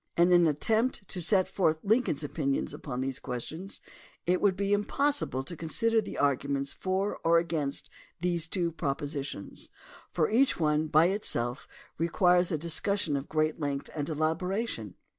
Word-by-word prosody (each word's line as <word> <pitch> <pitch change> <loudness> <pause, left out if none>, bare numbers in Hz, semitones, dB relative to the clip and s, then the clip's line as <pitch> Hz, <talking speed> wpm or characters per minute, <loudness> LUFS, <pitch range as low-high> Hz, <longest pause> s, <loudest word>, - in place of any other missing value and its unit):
In 175 +1 +5
an 175 -1 +6
attempt 215 - 0
to 180 - -4
set 185 +3 +3
forth 160 -5 +1
Lincoln's 210 - +1
opinions 140 -2 -1
upon 130 -3 -5
these 130 0 -3
questions 160 - -6 0.5
it 180 +1 +2
would 195 -2 +3
be 200 +1 0
impossible 210 - 0
to 170 +6 -7
consider 225 +8 +1
the 205 - -7
arguments 140 0 0
for 190 +2 -1
or 165 0 +5
against 160 -5 -1 0.3
these 170 -1 -1
two 170 -1 -1
propositions, 140 -6 -4 0.4
for 155 - +1
each 255 0 +3
one 155 -1 +2
by 155 +3 +5
itself 125 - 0 0.3
requires 175 +1 +3
a 160 - +1
discussion 170 +1 0
of 140 +1 -4
great 155 0 0
length 145 -2 -3
and 145 -1 -3
elaboration. 160 - -2
165 Hz, 150 wpm, -29 LUFS, 145-190 Hz, 0.5 s, an